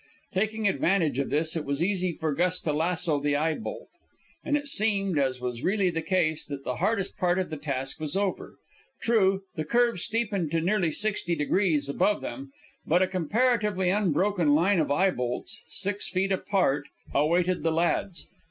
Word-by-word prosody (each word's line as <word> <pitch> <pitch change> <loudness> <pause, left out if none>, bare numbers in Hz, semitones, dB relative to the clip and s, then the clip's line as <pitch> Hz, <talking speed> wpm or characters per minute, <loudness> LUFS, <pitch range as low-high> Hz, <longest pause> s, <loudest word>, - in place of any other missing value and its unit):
Taking 215 +2 0
advantage 175 -7 +1
of 140 - -1
this, 160 +2 0
it 160 - -2
was 140 +3 -1
easy 185 -1 0
for 160 -2 -2
Gus 180 +4 +1
to 155 - -1
lasso 165 -1 +1
the 145 0 0
eye 160 +2 +1
bolt. 220 - -7 0.6
And 295 - +1
it 290 0 -5
seemed, 200 - +2
as 130 -2 0
was 125 -1 -4
really 190 +1 +1
the 165 -1 -2
case, 160 -2 0
that 140 -2 -6
the 125 -2 -3
hardest 210 -3 0
part 180 0 +1
of 185 -3 -2
the 155 - -4
task 135 -2 -3
was 155 +3 -2
over. 200 -2 -2 0.4
True, 195 -4 +2
the 155 - -3
curve 235 +4 +2
steepened 205 -6 -1
to 165 - +2
nearly 185 0 +1
sixty 205 -3 -1
degrees 155 -2 +1
above 205 +8 +1
them, 135 +3 -7 0.3
but 175 +4 +3
a - - +1
comparatively 205 - +1
unbroken 185 -4 +2
line 180 +4 +3
of 155 - 0
eye 185 +7 +3
bolts, 125 - -3
six 200 +1 -1
feet 190 +1 0
apart, 185 -7 +1 0.3
awaited 175 +5 +2
the 165 +1 +1
lads. 170 +2 0
180 Hz, 180 wpm, -27 LUFS, 150-200 Hz, 0.6 s, but